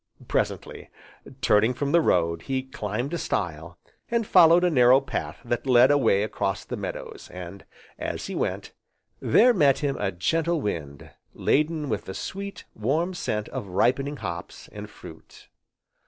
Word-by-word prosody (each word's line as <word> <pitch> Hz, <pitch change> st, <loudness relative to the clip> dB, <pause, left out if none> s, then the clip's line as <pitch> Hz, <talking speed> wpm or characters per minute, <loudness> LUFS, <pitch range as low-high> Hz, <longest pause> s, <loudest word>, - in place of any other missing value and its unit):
Presently, -, -, -2 dB, 0.5 s
turning 110 Hz, +3 st, +3 dB
from 140 Hz, +2 st, -2 dB
the 170 Hz, +1 st, +5 dB
road, 85 Hz, -, +1 dB
he 130 Hz, +4 st, -2 dB
climbed 120 Hz, -, -4 dB
a 170 Hz, -, -1 dB
stile, 85 Hz, -, -3 dB, 0.3 s
and 235 Hz, -1 st, 0 dB
followed 175 Hz, -2 st, +6 dB
a 180 Hz, -, +3 dB
narrow 125 Hz, -2 st, +6 dB
path 135 Hz, -, -5 dB
that 120 Hz, +3 st, -2 dB
led 125 Hz, +1 st, +6 dB
away 115 Hz, -8 st, +3 dB
across 110 Hz, -, -2 dB
the -, -, -5 dB
meadows, -, -, -7 dB
and, 90 Hz, +2 st, -9 dB, 0.3 s
as -, -, -4 dB
he -, -, -5 dB
went, -, -, -3 dB, 0.5 s
there 245 Hz, +2 st, +5 dB
met 140 Hz, -, +4 dB
him 140 Hz, -2 st, -2 dB
a 100 Hz, -1 st, 0 dB
gentle 165 Hz, -, 0 dB
wind 75 Hz, -, -5 dB, 0.2 s
laden 155 Hz, 0 st, +1 dB
with 110 Hz, -5 st, -3 dB
the 95 Hz, -, -7 dB
sweet, 200 Hz, -, -6 dB
warm 155 Hz, -, -1 dB
scent 105 Hz, -11 st, -3 dB
of 100 Hz, -, -5 dB
ripening 130 Hz, +9 st, +1 dB
hops, 85 Hz, -6 st, -7 dB
and -, -, -8 dB
fruit. -, -, -14 dB
130 Hz, 155 wpm, -25 LUFS, 100-155 Hz, 0.5 s, followed